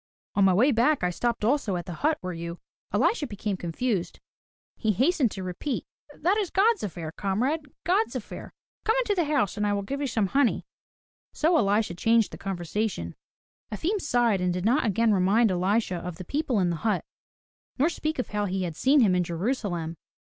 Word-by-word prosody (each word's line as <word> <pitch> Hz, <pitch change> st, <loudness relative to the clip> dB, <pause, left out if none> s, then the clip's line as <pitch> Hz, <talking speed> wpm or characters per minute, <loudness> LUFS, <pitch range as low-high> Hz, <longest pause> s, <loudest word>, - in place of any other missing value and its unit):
"On 200 Hz, -, +3 dB
my 190 Hz, -, +5 dB
way 250 Hz, +9 st, +4 dB
back 245 Hz, +2 st, +2 dB
I 180 Hz, -, +2 dB
stopped 235 Hz, +3 st, -1 dB
also 235 Hz, -6 st, +1 dB
at 175 Hz, -, -4 dB
the 180 Hz, -, -6 dB
hut 305 Hz, +1 st, +2 dB
where 185 Hz, 0 st, -4 dB
you—" 170 Hz, +1 st, -6 dB, 0.3 s
Elisha 300 Hz, -10 st, +1 dB
became 205 Hz, -2 st, -3 dB
confused. 180 Hz, +3 st, -2 dB, 0.6 s
He 220 Hz, -2 st, 0 dB
hastened 265 Hz, -, +2 dB
to 190 Hz, -2 st, -6 dB
repeat: 185 Hz, -, -3 dB, 0.3 s
"That 365 Hz, +6 st, +2 dB
is 405 Hz, -5 st, 0 dB
God's 430 Hz, +3 st, +3 dB
affair, 165 Hz, -5 st, -5 dB
comrade, 250 Hz, -, -1 dB, 0.2 s
God's 380 Hz, +7 st, +1 dB
affair. -, -, -7 dB, 0.3 s
Come 445 Hz, -, +2 dB
on -, -, +3 dB
into 445 Hz, -4 st, 0 dB
the 350 Hz, -4 st, +1 dB
house 235 Hz, -9 st, +1 dB
and 210 Hz, 0 st, +1 dB
I 205 Hz, -, +1 dB
will 200 Hz, 0 st, -1 dB
give 275 Hz, +7 st, -4 dB
you 285 Hz, -, 0 dB
some 225 Hz, -4 st, +1 dB
honey." 275 Hz, 0 st, +2 dB, 0.7 s
So 325 Hz, +3 st, +2 dB
Elisha 210 Hz, -, +2 dB
changed 225 Hz, +4 st, +2 dB
the -, -, -9 dB
conversation. 185 Hz, -, -3 dB, 0.6 s
Efim 360 Hz, -, -1 dB
sighed 240 Hz, -8 st, +2 dB
and 180 Hz, 0 st, +1 dB
did 180 Hz, +1 st, -3 dB
not 245 Hz, +3 st, +3 dB
again 220 Hz, +2 st, +3 dB
remind 200 Hz, +4 st, +3 dB
Elisha 185 Hz, +1 st, +1 dB
of 180 Hz, 0 st, -6 dB
the 185 Hz, +1 st, -9 dB
people 280 Hz, -, -1 dB
in 180 Hz, -2 st, +2 dB
the 170 Hz, -, -2 dB
hut 210 Hz, 0 st, -1 dB, 0.7 s
nor 280 Hz, +4 st, +3 dB
speak 315 Hz, -2 st, -2 dB
of 250 Hz, -, -3 dB
how 210 Hz, -1 st, -1 dB
he 190 Hz, -1 st, -2 dB
had 170 Hz, -3 st, -4 dB
seen 275 Hz, -, +4 dB
him 200 Hz, -6 st, +4 dB
in 180 Hz, 0 st, +2 dB
Jerusalem. 175 Hz, -2 st, -2 dB
215 Hz, 200 wpm, -26 LUFS, 185-280 Hz, 0.7 s, my